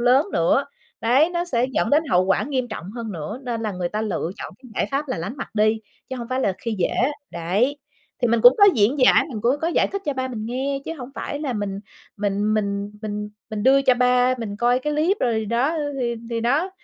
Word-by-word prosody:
lớn 255 +5 +4
nữa. 170 +12 +2 0.4
Đấy, 260 +8 +4
nó 345 0 -1
sẽ 245 -7 0
dẫn - - 0
đến 295 +2 +4
hậu 180 +1 +4
quả 195 +2 +2
nghiêm 255 -1 -2
trọng 195 -4 -7
hơn 225 -1 -6
nữa, 175 - -6
nên 235 -3 -3
là 215 -2 -2
người 180 -1 -2
ta 210 +4 -3
lựa 190 -5 -2
chọn - - -8
cái 250 - -14
giải - - 0
pháp 280 +1 -2
là 255 - -2
lánh 195 - -5
mặt - - -5
đi, 215 +1 +2 0.3
chứ 260 - -3
hổng 235 -2 -6
phải 255 +1 -1
là 200 - +1
khi 230 -2 -3
dể. 175 - +2 0.4
Đấy. 190 - 0 0.5
Thì 245 - +3
mình 230 0 +2
cũng 245 +3 +9
có 405 - +8
diễn 230 +6 +2
giải, 255 - +6
mình 230 -7 -5
cũng 245 +6 +2
có 330 - 0
giải - - +2
thích 395 0 -4
cho 290 - 0
ba 260 0 -3
mình 220 -4 -5
nghe, 270 +3 -2
chứ 325 - -4
hổng 250 +1 -7
phải 285 - -4
là 285 -4 -2
mình 205 -3 -3 0.4
mình 205 +1 0
mình 200 -1 -1
mình 210 -1 -4 0.2
mình 215 -1 -3
đưa 275 +2 +5
cho 260 -2 +4
ba 250 0 +3
mình 205 -3 -5
coi 240 +2 +3
cái 300 +3 -2
clip 320 +7 +2
rồi 225 -3 +1
đó, 245 +9 0 0.2
thì 235 -1 0 0.2
thì 230 - -1
đó, 285 +11 +1
240 Hz, 245 wpm, -23 LUFS, 210-265 Hz, 0.5 s, cũng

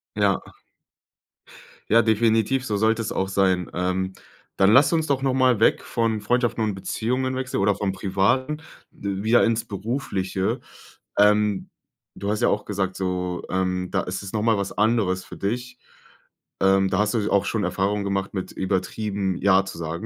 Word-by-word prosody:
Ja. - - +2 1.5
Ja, 115 +1 +6
definitiv, 115 +3 +2
so 105 -5 -1
sollte 110 +2 +2
es 110 - -4
auch 95 - -1
sein. 95 -2 +1
Ähm, 95 +1 -1 0.4
dann 95 +1 +4
lass 140 +7 +6
uns 160 -1 +1
doch 140 -2 0
noch 135 -1 +1
mal 130 -3 +3
weg 110 - +3
von 115 -2 -1
Freundschaften 120 +1 0
und 105 -2 -1
Beziehungen 125 +7 -2
wechseln, 130 -3 -2
oder 100 0 +3
vom 100 -1 -1
Privaten, 105 +10 0 0.3
wieder 100 +4 +1
ins 115 0 +1
Berufliche. 100 -3 -2 0.6
Ähm, 105 -1 +3 0.5
du 100 - -4
hast 105 - -2
ja - - +4
auch - - -1
gesagt, 95 -2 -2
so, 90 -1 -2
ähm, 90 -1 -1
da - - +1
ist 95 +2 -5
es 95 - -7
noch 105 -1 -1
mal 115 -1 +3
was 100 0 -2
anderes 105 -4 +1
für - - -10
dich. 125 +5 -3 0.8
Ähm, 95 0 +4
da - - 0
hast 105 +2 +1
s 110 -3 0
du - - -2
auch 100 0 +3
schon 105 0 -1
Erfahrungen 100 +3 0
gemacht 100 0 -2
mit 95 -2 -4
übertrieben 95 0 -2
„ja“ 95 0 +3
zu 95 - -8
sagen, 85 0 -5
100 Hz, 175 wpm, -24 LUFS, 95-115 Hz, 1.5 s, Ja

